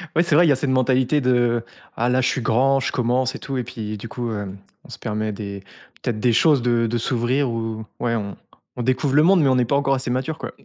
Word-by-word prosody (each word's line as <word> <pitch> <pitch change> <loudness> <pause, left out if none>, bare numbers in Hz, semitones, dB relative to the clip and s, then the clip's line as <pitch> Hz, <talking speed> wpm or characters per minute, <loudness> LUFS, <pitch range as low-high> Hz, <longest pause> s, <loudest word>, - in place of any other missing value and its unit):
Ouais 170 - +4
c'est 170 -4 +1
vrai 175 +2 +6
il - - +3
y - - +5
a - - +1
cette 135 +1 -2
mentalité 130 +2 +2
de 120 -2 +1 0.3
ah 120 - +1
là 125 +1 +2
je - - +1
suis 130 - -1
grand, 135 +4 +2
je - - -2
commence 125 +1 0
et - - -7
tout 135 -1 -5
et 125 - -1
puis 110 -3 -6
du 115 - -8
coup 120 0 -4
heu, 100 -2 -4 0.4
on - - -16
se - - -9
permet 110 0 -3
des 100 -1 -7 0.4
peut-être 110 -3 -2
des 120 - +3
choses, 145 +2 +4
de 120 -1 +1
de 120 +2 -1
s'ouvrir 125 +3 0
ou 115 -1 -4 0.2
ouais 115 -1 0
on 100 -2 -4 0.4
on 120 - -2
découvre 130 +2 0
le 150 - +6
monde, 185 -1 +5
mais 140 - +3
on 130 - +3
est 125 - +2
pas 140 - 0
encore 135 -1 +2
assez 130 -1 -4
mature 130 +5 -2
quoi. - - -6
125 Hz, 270 wpm, -22 LUFS, 115-135 Hz, 0.4 s, vrai